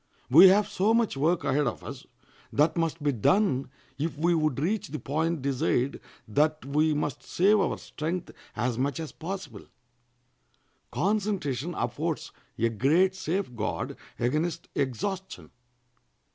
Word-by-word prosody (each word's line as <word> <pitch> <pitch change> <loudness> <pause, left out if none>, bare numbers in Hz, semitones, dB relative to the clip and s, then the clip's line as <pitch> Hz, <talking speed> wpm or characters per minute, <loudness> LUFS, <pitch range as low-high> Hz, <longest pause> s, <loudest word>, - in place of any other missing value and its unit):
We 170 +8 +10
have 200 +2 +5
so 210 +4 +2
much 230 -7 +1
work 160 +6 +1
ahead 145 0 +1
of 120 - -4
us - - -8 0.4
that 155 +3 +2
must 165 -2 -1
be 145 - +3
done 135 - +2 0.3
if 160 +1 -2
we 170 +3 +2
would 155 -5 +1
reach 195 +8 -1
the 150 - -5
point 155 +1 -1
desired 135 -1 0 0.3
that 150 +6 +1
we 150 +2 +2
must 145 -3 -2
save 205 +4 +3
our - - 0
strength 170 +3 -4 0.2
as 120 +1 -1
much 140 +4 -1
as 160 -2 -5
possible. 160 - -7 1.2
Concentration 185 - -1
affords - - -2 0.3
a 115 - +2
great 155 - +3
safe 185 -6 -3
guard 110 -1 -3 0.2
against 150 +8 -1
exhaustion. 180 - -3
155 Hz, 135 wpm, -27 LUFS, 135-185 Hz, 1.2 s, We